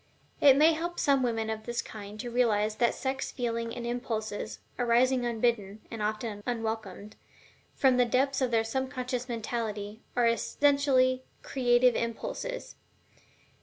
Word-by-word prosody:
It 275 -2 +7
may 315 +3 +6
help 345 +2 -4
some 280 -2 +3
women 225 -3 0
of 220 +1 -6
this 240 0 -2
kind 210 0 -9
to 240 -1 -6
realize 215 -3 +2
that 240 - +4
the - - -11
sex 265 0 -2
feeling 230 -2 -2
and 235 - -5
impulses, 220 -3 -3 0.2
arising 245 +1 +3
unbidden 220 -3 -1
(and 225 -2 -5
often 215 0 -2
unwelcomed) 220 -3 -4 0.6
from 260 -2 +4
the 250 - +5
depths 270 +4 +1
of 255 - +2
their 225 -1 +2
subconscious 255 +1 -3
mentality, 220 -2 -4
are 245 -1 +3
essentially 255 +2 +2 0.2
CREATIVE 245 -2 +3
impulses. - - -4
240 Hz, 140 wpm, -29 LUFS, 220-255 Hz, 0.6 s, It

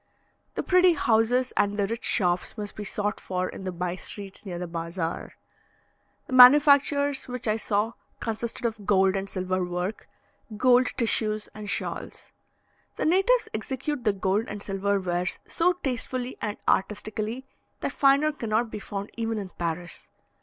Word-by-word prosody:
The - - -2
pretty 365 -1 +5
houses 245 -1 +2
and 205 0 +1
the 200 - +2
rich 230 +3 -4
shops 180 +2 +1
must 205 -1 -5
be 210 - -5
sought 205 +1 -2
for 185 0 -2
in 190 - -8
the 185 - -2
bye 180 0 -3
streets 200 +1 -5
near 175 -2 -4
the 180 - -4
bazaar. 165 0 -4 0.9
The - - -8
manufactures 285 +2 +6
which 250 -1 -4
I 215 0 +2
saw, 215 +1 0 0.3
consisted 230 +1 -3
of 220 -3 -3
gold 190 -1 +4
and 195 0 -3
silver 185 -1 -1
work, 180 +3 -4 0.5
gold 250 +2 +5
tissues 215 -2 0
and 210 -1 -7
shawls. - - -4 0.6
The - - -2
natives 390 +9 +3
execute 260 +4 -3
the 215 - +3
gold 195 +2 0
and 205 -1 -6
silver 200 0 0
wares 180 -1 -1
so 355 +2 +2
tastefully 255 -5 -3
and 210 -1 -3
artistically, 215 +5 -1 0.4
that - - -1
finer 280 +2 +4
cannot 230 -4 -1
be - - -5
found 200 0 -6
even 225 -1 -1
in 200 -3 -5
Paris. 170 0 -4
215 Hz, 155 wpm, -26 LUFS, 190-250 Hz, 0.9 s, manufactures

